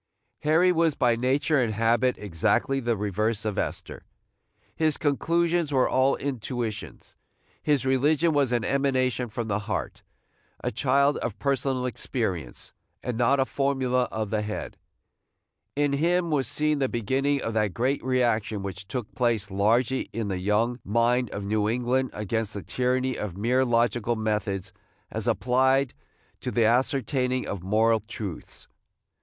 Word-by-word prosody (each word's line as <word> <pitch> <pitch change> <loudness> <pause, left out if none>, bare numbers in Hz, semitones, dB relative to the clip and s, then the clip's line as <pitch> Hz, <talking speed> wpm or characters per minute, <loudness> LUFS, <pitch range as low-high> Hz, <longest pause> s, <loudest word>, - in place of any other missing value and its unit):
Harry 165 +4 +4
was 165 -3 +2
by 120 -3 +3
nature 135 +4 +2
and 110 -3 -1
habit 115 +3 +2
exactly 105 +8 0
the 120 -3 0
reverse 105 +2 -1
of 105 -2 -1
Esther. - - -4 0.7
His 155 -2 +1
conclusions 170 +2 +1
were 130 -2 +3
all 130 +1 +3
intuitions. 120 -5 -5 0.5
His 145 -4 +1
religion 150 +5 +3
was 140 -4 +2
an 120 -3 +1
emanation 130 -3 +1
from 115 +1 -4
the 100 -1 0
heart, 105 -3 -4 0.6
a - - -1
child 140 +4 +2
of 115 - -4
personal 135 -2 0
experience, 95 - -3 0.3
and 125 - -2
not 125 +4 +3
a 135 - +3
formula 130 -2 0
of 110 -2 -3
the 110 -1 +1
head. 105 0 -5 1.0
In 145 0 +1
him 170 +3 +1
was 135 -5 +1
seen 150 +3 +1
the 135 -2 +1
beginning 135 +5 0
of 115 - -2
that 105 -4 0
great 130 +4 0
reaction 115 -5 0
which 100 0 -6
took 125 -2 -5
place 115 -5 0
largely 115 +7 +1
in 115 -3 -3
the 95 -2 -2
young 110 +6 +1
mind 120 +3 +2
of 100 - -5
New 105 +1 +1
England 125 +2 0
against 105 +1 -2
the 100 - -5
tyranny 130 +1 0
of 95 -4 -5
mere 125 +5 +2
logical 120 -1 +1
methods 105 -3 -2 0.4
as - - -2
applied 130 +1 +2 0.5
to - - -4
the 115 - +2
ascertaining 130 +1 +1
of 100 - -4
moral 110 +4 +3
truths. 105 -4 -8
125 Hz, 150 wpm, -26 LUFS, 110-135 Hz, 1.0 s, Harry